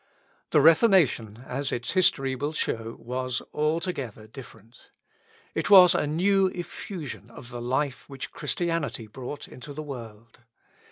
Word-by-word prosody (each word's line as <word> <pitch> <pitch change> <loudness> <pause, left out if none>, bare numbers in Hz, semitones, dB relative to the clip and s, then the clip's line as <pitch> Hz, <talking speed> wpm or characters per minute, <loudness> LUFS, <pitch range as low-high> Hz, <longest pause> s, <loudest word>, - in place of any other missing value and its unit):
The - - +4
Reformation, 155 - +4
as 135 +2 -3
its 120 +1 -1
history 135 -8 +2
will 145 +4 -3
show, 115 -6 -2
was 125 +1 -3
altogether 150 - -2
different. 115 -1 -14 0.6
It - - -2
was 185 -3 +9
a - - +1
new 190 +5 +3
effusion 175 - -7
of 120 +1 -12
the 120 0 -6
life 130 +3 -2
which 135 -1 -7
Christianity 165 -9 -2
brought 130 +6 -7
into 145 +3 -10
the 155 +2 -6
world. 115 -6 -10
135 Hz, 130 wpm, -26 LUFS, 120-165 Hz, 0.6 s, was